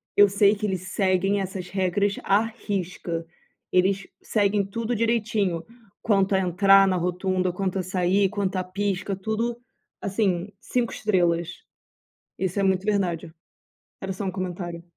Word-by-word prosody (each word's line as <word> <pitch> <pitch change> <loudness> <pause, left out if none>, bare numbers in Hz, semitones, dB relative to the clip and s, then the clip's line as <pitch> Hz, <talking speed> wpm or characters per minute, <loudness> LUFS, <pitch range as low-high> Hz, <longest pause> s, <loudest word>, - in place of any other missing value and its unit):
eu 205 - +8
sei 200 +1 +4
que 210 +1 -3
eles 190 -3 -1
seguem 195 +1 +1
essas 185 -1 -5
regras 195 +1 +1
à 200 +2 +4
risca, 185 -7 -4 0.5
eles 190 +1 +2
seguem 205 -1 +1
tudo 230 +4 -3
direitinho 215 -6 0 0.4
quanto 195 -2 +2
a - - +3
entrar 195 +2 +5
na 185 -1 +1
rotunda, 180 +1 0
quanto 190 +1 -2
a - - -1
sair, 185 +2 +2
quanto 195 -2 -2
a 185 - 0
pisca, 195 +1 -2
tudo 220 +4 -2 0.4
assim, 195 -2 0
5 245 -2 -1
estrelas. 175 -5 +1 0.9
Isso 190 +1 -1
é - - +2
muito 190 -1 +2
verdade. 185 -6 -1 0.7
Era 190 - -3
só 195 +2 -5
um 190 - -1
comentário. 175 -2 -5
195 Hz, 145 wpm, -25 LUFS, 180-205 Hz, 0.9 s, eu